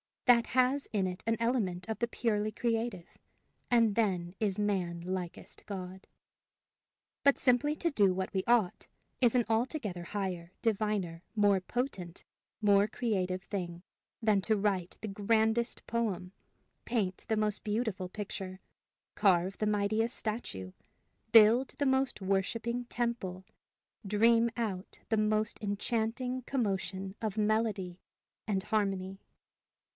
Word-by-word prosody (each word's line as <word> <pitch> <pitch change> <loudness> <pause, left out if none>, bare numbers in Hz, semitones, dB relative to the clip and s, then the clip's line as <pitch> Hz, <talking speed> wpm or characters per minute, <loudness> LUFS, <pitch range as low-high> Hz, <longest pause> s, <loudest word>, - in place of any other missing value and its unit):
That 240 -2 +6
has 260 +2 +2
in 200 -3 +2
it 180 0 -6
an 225 - +3
element 210 -7 0
of 220 - -2
the 235 - +1
purely 215 -3 0
creative, 230 -5 -2 0.5
and 230 -3 +4
then 185 -6 0
is 200 -4 0
man 185 -5 -1
likest 180 -1 -5
God. 190 -1 -7 1.2
But 280 -1 +5
simply 265 +4 +3
to 335 +1 0
do 200 -8 +4
what 185 0 -3
we 190 -1 0
ought, 230 -7 +2 0.3
is 245 -2 +4
an 240 -2 +3
altogether 225 - -1
higher, 185 -2 -4
diviner, 205 -6 0
more 205 -2 +4
potent, 185 -5 -4 0.4
more 205 -1 +5
creative 190 -5 -1
thing, 175 -4 -5 0.4
than 210 -3 +4
to 220 - +2
write 195 -4 -1
the 220 - -4
grandest 220 +3 +1
poem, 210 -6 -2 0.5
paint 200 -6 -1
the 220 -2 +1
most 210 -1 0
beautiful 210 -4 -2
picture, 190 -2 -6 0.5
carve 190 -2 +3
the 215 - 0
mightiest 215 +3 +1
statue, 155 - -4 0.6
build 230 +4 +7
the 285 - 0
most 265 -4 +1
worshiping 225 +5 -1
temple, 235 -7 -3 0.6
dream 230 +3 +4
out 200 -5 -3
the 220 - +2
most 215 +1 +1
enchanting 225 +5 -1
commotion 195 -6 -2
of 220 -2 -2
melody 210 -4 0 0.5
and 195 -3 0
harmony. 195 -3 -1
210 Hz, 125 wpm, -31 LUFS, 190-230 Hz, 1.2 s, build